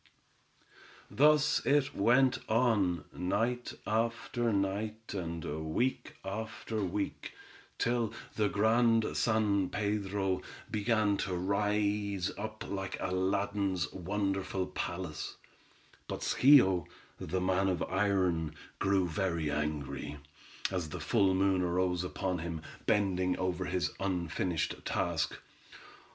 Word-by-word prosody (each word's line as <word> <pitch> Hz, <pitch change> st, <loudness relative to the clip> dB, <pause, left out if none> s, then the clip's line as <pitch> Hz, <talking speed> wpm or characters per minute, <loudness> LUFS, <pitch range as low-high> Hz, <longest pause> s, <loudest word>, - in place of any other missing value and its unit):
Thus 150 Hz, +1 st, +4 dB
it 145 Hz, 0 st, +2 dB
went 125 Hz, +5 st, +4 dB
on, 105 Hz, -9 st, +2 dB
night 115 Hz, +7 st, -1 dB
after 115 Hz, +1 st, 0 dB
night, 105 Hz, +3 st, -2 dB
and 85 Hz, -4 st, -4 dB, 0.3 s
week 130 Hz, +2 st, 0 dB
after 110 Hz, +1 st, -4 dB
week, 100 Hz, +2 st, -3 dB, 0.4 s
till 120 Hz, -2 st, +1 dB, 0.2 s
the 105 Hz, -2 st, +2 dB
Grand 115 Hz, +2 st, +3 dB
San 105 Hz, -4 st, +2 dB
Pedro 100 Hz, -2 st, -1 dB, 0.3 s
began 110 Hz, -2 st, +2 dB
to 95 Hz, -2 st, -2 dB
rise 100 Hz, 0 st, 0 dB
up 110 Hz, +1 st, -6 dB
like 95 Hz, -1 st, -3 dB
Aladdin's 95 Hz, -2 st, 0 dB
wonderful 95 Hz, 0 st, -1 dB
palace, 85 Hz, -3 st, -4 dB, 0.7 s
but, -, -, -4 dB
Schio, 95 Hz, -, +5 dB, 0.3 s
the 95 Hz, +4 st, -2 dB
man 95 Hz, +1 st, +2 dB
of 90 Hz, -, 0 dB
iron, 90 Hz, -5 st, +1 dB, 0.2 s
grew 95 Hz, -2 st, +2 dB
very 85 Hz, -2 st, -1 dB
angry, 75 Hz, 0 st, -3 dB, 0.5 s
as 90 Hz, -4 st, -2 dB
the -, -, -5 dB
full 100 Hz, -5 st, +3 dB
moon 95 Hz, -1 st, +3 dB
arose 90 Hz, 0 st, +1 dB
upon 90 Hz, 0 st, -2 dB
him, 80 Hz, -1 st, -5 dB, 0.2 s
bending 95 Hz, -3 st, +2 dB
over 90 Hz, 0 st, -1 dB
his 90 Hz, 0 st, 0 dB
unfinished 90 Hz, -3 st, -1 dB
task. -, -, -1 dB
95 Hz, 105 wpm, -32 LUFS, 90-110 Hz, 0.7 s, Schio